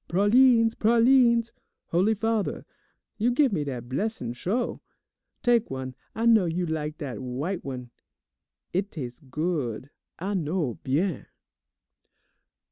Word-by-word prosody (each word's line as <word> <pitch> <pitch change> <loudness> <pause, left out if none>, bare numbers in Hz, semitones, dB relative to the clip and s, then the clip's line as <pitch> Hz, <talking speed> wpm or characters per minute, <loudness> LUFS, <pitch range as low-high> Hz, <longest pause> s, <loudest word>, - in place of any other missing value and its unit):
"Pralines, 230 +5 +5
pralines! 235 +1 +4 0.4
Holy 190 +6 +2
Father, 225 0 -1 0.5
you 230 +3 +3
give 255 -1 +3
me 155 -5 0
dat 125 -4 -5
blessin' 130 - -2
sho'? 200 - -2 0.6
Tak' 240 -2 +3
one, 130 -1 -5 0.2
I 225 - -1
know 225 -5 +6
you 175 +2 -1
lak 155 -1 -3
dat 140 -6 -5
w'ite 140 +9 -3
one. 125 -3 -6 0.8
It 190 +3 0
tas' 125 -9 -7
good, 145 -4 -3 0.3
I 195 +4 -3
know, 160 - -1
bien. 150 +4 -1
180 Hz, 120 wpm, -26 LUFS, 140-225 Hz, 0.8 s, know